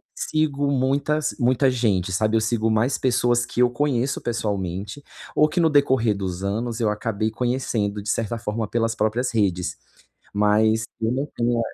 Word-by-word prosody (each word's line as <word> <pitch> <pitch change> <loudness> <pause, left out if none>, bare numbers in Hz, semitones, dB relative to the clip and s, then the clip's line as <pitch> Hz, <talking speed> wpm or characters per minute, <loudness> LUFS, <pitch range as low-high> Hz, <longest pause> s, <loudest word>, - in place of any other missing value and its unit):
sigo 145 -2 0
muitas 140 +3 0
muita 130 +2 +3
gente, 105 -7 0
sabe. 110 +3 +1
Eu - - +1
sigo 115 0 0
mais 110 +5 +2
pessoas 120 -1 +2
que 120 0 -6
eu 125 - +5
conheço 135 0 0
pessoalmente 100 +1 -3 0.3
ou 150 - +4
que 175 - -1
no 165 -2 +4
decorrer 130 -7 +3
dos 95 -2 -4
anos, 110 +4 -2
eu 110 -3 +2
acabei 110 +1 -2
conhecendo 115 -4 -1
de 105 - -5
certa 115 +1 -1
forma 110 0 -3
pelas 115 +1 0
próprias 115 +4 0
redes, 95 -5 0 0.6
mas 110 +2 +3 0.2
eu 110 +1 +1
não 135 +3 -1
tenho 120 0 +1
115 Hz, 165 wpm, -23 LUFS, 105-130 Hz, 0.6 s, eu